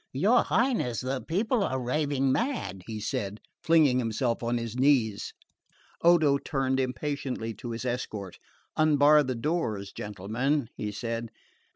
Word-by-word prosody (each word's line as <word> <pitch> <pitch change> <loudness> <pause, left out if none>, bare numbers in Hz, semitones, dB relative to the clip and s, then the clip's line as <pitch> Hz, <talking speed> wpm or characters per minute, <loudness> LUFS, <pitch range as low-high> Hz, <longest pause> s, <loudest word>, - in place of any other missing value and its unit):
"Your - - +4
Highness, 230 - +1
the 130 +1 -2
people 215 +6 0
are 130 -8 -1
raving 135 +1 0
mad," 225 - -2
he 110 -2 -5
said, 105 -1 -3 0.2
flinging 160 -7 +4
himself 115 0 -1
on 120 0 0
his 115 -1 -4
knees. 125 -6 +2 0.7
Odo 160 -5 +5
turned 135 -2 -1
impatiently 130 -2 -3
to 120 - -7
his 115 +2 -5
escort. 110 -6 -4 0.4
"Unbar 150 -1 +5
the 130 -3 -2
doors, 115 - -2
gentlemen," 115 +7 -2
he 105 -1 -4
said. 115 +2 -4
130 Hz, 135 wpm, -28 LUFS, 115-150 Hz, 0.7 s, Odo